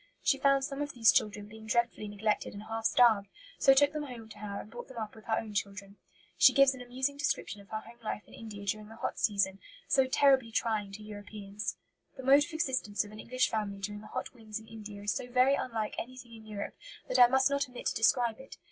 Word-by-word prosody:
She 275 Hz, -, +3 dB
found 275 Hz, 0 st, +4 dB
some 275 Hz, +1 st, -3 dB
of 290 Hz, -1 st, -3 dB
these 225 Hz, -3 st, +6 dB
children 210 Hz, -1 st, +1 dB
being 220 Hz, +1 st, -12 dB
dreadfully 235 Hz, -2 st, 0 dB
neglected 205 Hz, +1 st, -1 dB
and 205 Hz, -, -7 dB
half 225 Hz, 0 st, -5 dB
starved, 225 Hz, -4 st, +5 dB, 0.3 s
so 270 Hz, -, +7 dB
took 285 Hz, +2 st, +5 dB
them 305 Hz, -, -2 dB
home 245 Hz, -6 st, -8 dB
to 210 Hz, -, -12 dB
her 205 Hz, -1 st, -5 dB
and 215 Hz, -, -14 dB
brought 240 Hz, +1 st, -8 dB
them 260 Hz, -, -12 dB
up 215 Hz, -2 st, -4 dB
with 220 Hz, -, -15 dB
her 220 Hz, -, +1 dB
own 215 Hz, -2 st, -4 dB
children. 200 Hz, 0 st, -4 dB, 0.4 s
She -, -, +8 dB
gives 275 Hz, -1 st, +6 dB
an 260 Hz, -, -9 dB
amusing 260 Hz, +3 st, -2 dB
description 210 Hz, -8 st, -2 dB
of 200 Hz, -, -19 dB
her 220 Hz, 0 st, -3 dB
home 235 Hz, +2 st, -15 dB
life 210 Hz, -1 st, -3 dB
in -, -, -18 dB
India 210 Hz, -3 st, -8 dB
during 210 Hz, +1 st, -2 dB
the 225 Hz, -, -12 dB
hot -, -, -4 dB
season, 200 Hz, -2 st, +1 dB, 0.3 s
so 265 Hz, -2 st, +4 dB
terribly 265 Hz, -3 st, +4 dB
trying 215 Hz, -3 st, 0 dB
to 210 Hz, +2 st, -8 dB
Europeans: 205 Hz, 0 st, -6 dB, 0.4 s
"The 265 Hz, -, -7 dB
mode 280 Hz, +3 st, +6 dB
of 340 Hz, -, -12 dB
existence 260 Hz, -11 st, 0 dB
of 205 Hz, -, -11 dB
an 215 Hz, -, -11 dB
English 255 Hz, +3 st, +1 dB
family 210 Hz, -2 st, -2 dB
during 205 Hz, +1 st, -5 dB
the 215 Hz, -, -11 dB
hot -, -, -5 dB
winds 220 Hz, -3 st, -7 dB
in 220 Hz, -, -14 dB
India 210 Hz, -2 st, -9 dB
is 205 Hz, -, +1 dB
so -, -, -4 dB
very 255 Hz, +2 st, +4 dB
unlike 225 Hz, -6 st, -2 dB
anything 250 Hz, -1 st, -8 dB
in 220 Hz, -1 st, -12 dB
Europe 205 Hz, -1 st, -5 dB, 0.3 s
that -, -, +1 dB
I 245 Hz, -, +10 dB
must 265 Hz, +2 st, +3 dB
not 280 Hz, -1 st, 0 dB
omit 250 Hz, -, -9 dB
to -, -, +1 dB
describe 230 Hz, +1 st, +3 dB
it. 265 Hz, -, -11 dB
225 Hz, 240 wpm, -31 LUFS, 210-260 Hz, 0.4 s, I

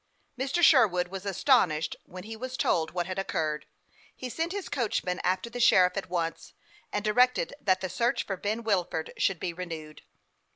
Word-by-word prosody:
Mr. 275 Hz, +7 st, -1 dB
Sherwood 195 Hz, -, +5 dB
was 195 Hz, +1 st, -6 dB
astonished 185 Hz, -, +2 dB
when 185 Hz, 0 st, -9 dB
he 225 Hz, +2 st, -7 dB
was 255 Hz, +3 st, -6 dB
told 160 Hz, -1 st, +1 dB
what 175 Hz, -1 st, -2 dB
had 185 Hz, +1 st, -4 dB
occurred. 155 Hz, -5 st, -2 dB, 0.5 s
He 255 Hz, -, -6 dB
sent 330 Hz, +5 st, -2 dB
his 400 Hz, -2 st, -4 dB
coachman 205 Hz, -8 st, -1 dB
after 185 Hz, +5 st, 0 dB
the 240 Hz, +1 st, -7 dB
sheriff 180 Hz, -6 st, +5 dB
at 195 Hz, -2 st, -4 dB
once, 170 Hz, -2 st, -3 dB, 0.4 s
and 205 Hz, 0 st, -2 dB
directed 250 Hz, +4 st, +3 dB
that 190 Hz, -1 st, +2 dB
the 190 Hz, -, -1 dB
search 235 Hz, +6 st, 0 dB
for 195 Hz, -, -3 dB
Ben 210 Hz, +5 st, -3 dB
Wilford 180 Hz, -7 st, -1 dB
should 195 Hz, -4 st, +1 dB
be 175 Hz, -, -3 dB
renewed. 165 Hz, -4 st, -7 dB
195 Hz, 175 wpm, -28 LUFS, 175-235 Hz, 0.5 s, Sherwood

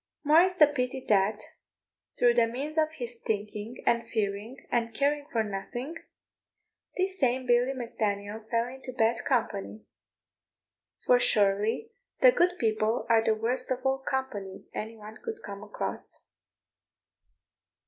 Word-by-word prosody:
More 310 Hz, +3 st, +7 dB
is 365 Hz, 0 st, +2 dB
the 310 Hz, -, +8 dB
pity 265 Hz, -2 st, -2 dB
that, 205 Hz, +1 st, +3 dB, 0.8 s
through 240 Hz, -1 st, +5 dB
the 235 Hz, -1 st, +4 dB
means 275 Hz, +7 st, -4 dB
of 310 Hz, -1 st, +2 dB
his 240 Hz, -5 st, -6 dB
thinking, 210 Hz, +2 st, -4 dB
and 235 Hz, -1 st, +1 dB
fearing, 210 Hz, +3 st, -3 dB
and 230 Hz, -1 st, 0 dB
caring 285 Hz, +2 st, +1 dB
for 225 Hz, -2 st, +1 dB
nothing, 215 Hz, +8 st, -5 dB, 1.0 s
this 375 Hz, +1 st, 0 dB
same 255 Hz, -1 st, +1 dB
Billy 245 Hz, +2 st, +3 dB
Mac 240 Hz, -2 st, -7 dB
Daniel 205 Hz, 0 st, -1 dB
fell 230 Hz, +1 st, -1 dB
into 260 Hz, +1 st, -8 dB
bad 230 Hz, -1 st, +1 dB
company; 215 Hz, -4 st, -1 dB, 1.2 s
for 250 Hz, -, +5 dB
surely 210 Hz, -, +2 dB, 0.3 s
the -, -, +8 dB
good 360 Hz, -5 st, +2 dB
people 220 Hz, -1 st, +1 dB
are 225 Hz, -1 st, +5 dB
the 220 Hz, -, +2 dB
worst 245 Hz, +4 st, -1 dB
of 255 Hz, 0 st, -2 dB
all 265 Hz, 0 st, +2 dB
company 260 Hz, -8 st, -4 dB
any 225 Hz, +1 st, -5 dB
one 215 Hz, 0 st, -11 dB
could 445 Hz, -1 st, -6 dB
come 200 Hz, 0 st, -7 dB
across. 210 Hz, 0 st, -5 dB
235 Hz, 140 wpm, -29 LUFS, 215-265 Hz, 1.2 s, the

